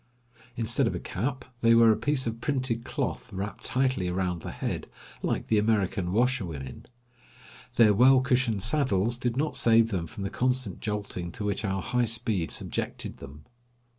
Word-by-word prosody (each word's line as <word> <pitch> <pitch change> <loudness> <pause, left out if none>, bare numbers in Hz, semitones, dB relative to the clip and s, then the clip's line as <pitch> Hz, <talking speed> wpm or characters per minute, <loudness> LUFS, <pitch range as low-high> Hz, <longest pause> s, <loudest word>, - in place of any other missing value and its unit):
Instead 115 -1 +1
of - - -1
a - - -3
cap, 130 +7 -3 0.2
they 115 0 +6
wear 115 -1 +7
a - - +3
piece 145 +1 0
of 115 0 -4
printed 130 -5 -1
cloth 125 -3 -3
wrapped 100 +1 -5
tightly 130 -7 0
around 90 -1 -1
the - - -6
head, - - -4 0.3
like - - -1
the 110 - +2
American 100 -4 +1
washerwomen. 95 - -1 0.9
Their 110 -3 +6
well 130 +5 +6
cushioned 125 -6 +1
saddles 120 -3 +1
did 120 -1 -1
not 155 +2 0
save 115 -1 +5
them 85 -4 -2
from 100 - -7
the 100 - -3
constant 125 -6 -1
jolting 100 -5 -4
to 105 - -5
which 100 +1 -1
our 95 -2 -1
high 125 -1 +1
speed 110 -6 0
subjected - - -4
them. 70 +2 -12
115 Hz, 165 wpm, -28 LUFS, 95-125 Hz, 0.9 s, wear